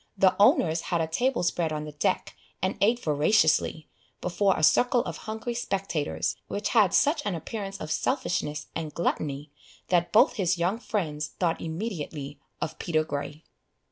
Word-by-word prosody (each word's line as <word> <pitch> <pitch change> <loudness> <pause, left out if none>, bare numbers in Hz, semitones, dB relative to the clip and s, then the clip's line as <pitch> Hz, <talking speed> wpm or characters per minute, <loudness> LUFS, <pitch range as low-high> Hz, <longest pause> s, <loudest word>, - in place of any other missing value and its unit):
The 190 -1 +4
owners 165 -5 +4
had 170 - +1
a 165 - +1
table 240 +8 0
spread 170 -2 0
on 150 -1 -3
the 150 - -7
deck, 150 - -1 0.2
and 185 +2 -1
ate 235 +4 +3
voraciously, 155 0 +2 0.3
before 190 +2 +1
a 155 - -3
circle 245 +8 +4
of - - -5
hungry 220 +2 -3
spectators, 195 -9 -2
which 205 - -2
had 210 -6 +4
such 295 +1 +3
an 200 - -1
appearance 195 +4 -5
of 155 - -5
selfishness 165 - -1
and 160 -2 -4
gluttony, 145 -3 -2 0.4
that 175 -1 +2
both 245 +4 +5
his 185 -2 +1
young 180 +6 0
friends 155 -10 -2
thought 170 -2 0
immediately 160 -5 -5 0.2
of 155 - -4
Peter 155 -2 +1
Grey. 150 +1 -5
175 Hz, 160 wpm, -27 LUFS, 155-210 Hz, 0.4 s, both